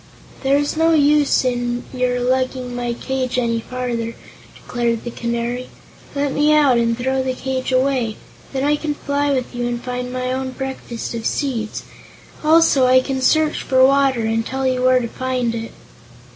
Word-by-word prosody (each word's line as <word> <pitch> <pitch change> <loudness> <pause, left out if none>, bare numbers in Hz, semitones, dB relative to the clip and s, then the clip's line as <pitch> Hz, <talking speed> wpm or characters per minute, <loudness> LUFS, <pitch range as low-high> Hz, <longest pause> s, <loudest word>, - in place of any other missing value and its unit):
"There 275 +1 +3
is 290 +1 -1
no 325 +1 +3
use 295 -2 +3
in 245 -1 -1
your 250 -1 0
lugging 255 0 -1
my 240 -1 -2
cage 255 0 -3
any 230 -2 +1
farther," 235 -1 -4 0.4
declared 235 -2 -2
the 240 - -5
Canary. 235 +2 -3 0.5
"Let 280 -1 0
me 295 +1 +3
out, 275 -5 +4
and 230 0 +1
throw 265 +2 0
the 260 -1 -2
cage 260 0 -3
away. 255 -4 +1 0.3
Then 270 -1 -2
I 295 +1 +2
can 295 0 -3
fly 285 0 -1
with 260 -2 -1
you 240 0 -2
and 240 0 -2
find 250 0 -4
my 255 0 -2
own 260 0 -3
breakfast 265 -4 -5
of 230 -1 -2
seeds. 235 -7 -2 0.6
Also 310 -4 +5
I 255 0 +6
can 265 0 -3
search 310 +3 +2
for 260 0 +4
water, 270 -2 +3
and 225 0 0
tell 265 +3 -3
you 255 -1 +1
where 255 0 +4
to 235 - -3
find 255 -1 -2
it." 230 0 -5
255 Hz, 175 wpm, -20 LUFS, 240-270 Hz, 0.6 s, I